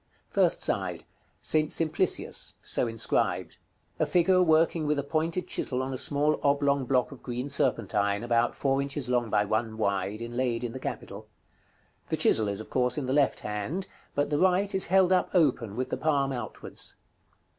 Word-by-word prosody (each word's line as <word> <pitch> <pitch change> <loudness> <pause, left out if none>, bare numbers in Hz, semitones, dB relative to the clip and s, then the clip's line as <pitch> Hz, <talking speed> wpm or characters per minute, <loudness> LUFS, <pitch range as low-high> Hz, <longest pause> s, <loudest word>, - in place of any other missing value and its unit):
§ - - -41
CXVII. - - -37
First - - +3
side. - - -1 0.4
"ST. 155 -1 +2
SIMPLICIUS": 165 +3 0
so 125 - +1
inscribed. 115 -1 -1 0.4
A - - +2
figure 185 +1 +3
working 160 -1 +3
with 150 0 +1
a 140 - -1
pointed 165 +4 -1
chisel 130 -7 -1
on 135 0 -4
a - - -3
small 150 +1 +1
oblong 140 -1 +2
block 125 +1 +1
of 135 - -11
green 125 +2 -4
serpentine, 105 -6 0
about 120 0 +1
four 135 0 +1
inches 140 -2 -3
long 120 -2 +1
by 105 0 +2
one 110 +1 -1
wide, 100 0 -1
inlaid 120 0 -2
in 120 - -3
the 130 - -7
capital. 105 -4 -6 0.8
The - - 0
chisel 110 -2 +3
is, 100 0 -2
of 110 - -10
course, 125 0 +1
in 145 - -2
the 130 - -1
left 140 -1 +2
hand, 105 - -3 0.3
but 145 +1 0
the 145 - +1
right 190 +2 +2
is 190 - +3
held 190 0 +4
up 185 - +2
open, 125 - +2
with 130 +2 -3
the - - -1
palm 140 -3 +1
outwards. 120 -4 -7
135 Hz, 185 wpm, -28 LUFS, 115-155 Hz, 0.8 s, held